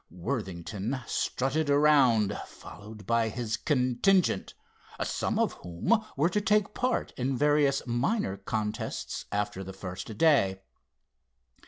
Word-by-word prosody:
Worthington 100 +3 -4
strutted 145 +7 -1
around 135 -8 +4
followed 105 +3 -12
by 115 +1 +2
his 110 -1 -2
contingent, 140 - +1 0.5
some - - -1
of - - +1
whom 90 - 0
were 155 +5 +3
to 210 - 0
take 210 0 +2
part 250 -1 -1
in 130 +1 -1
various 145 -1 +2
minor 120 - 0
contests 105 0 -4
after 105 -1 -2
the 95 0 -8
first 95 +3 -7
day. 100 -12 +3
120 Hz, 115 wpm, -29 LUFS, 105-150 Hz, 0.5 s, around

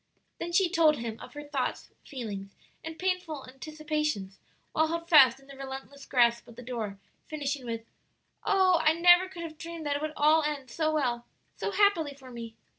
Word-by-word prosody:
Then 345 - -4
she 360 +2 +4
told 325 -3 +4
him 230 -1 -5
of - - -11
her 295 - -6
thoughts, 290 -3 -3
feelings, 205 -8 -7 0.3
and 320 0 -7
painful 360 -6 -2
anticipations 300 -7 -3 0.3
while 315 0 +2
held 335 +1 -3
fast 270 -7 +7
in 270 - -20
the 275 0 -12
relentless 270 +1 -8
grasp 235 -2 +3
of 235 - -13
the 245 - -10
door, 225 -5 -4 0.3
finishing 285 -4 -3
with, 230 -1 -4 0.6
"Oh, 375 -3 +4
I 310 0 +5
never 350 +2 +6
could 350 -3 -8
have 315 -2 -8
dreamed 335 -1 -7
that 285 -1 0
it - - -8
would 310 0 -3
all 305 +2 +5
end 290 -4 -3
so 315 -1 0
well, 245 -6 -1 0.3
so - - -3
happily 380 -8 +2
for 260 -2 -13
me!" 230 -2 -8
295 Hz, 190 wpm, -29 LUFS, 250-325 Hz, 0.6 s, fast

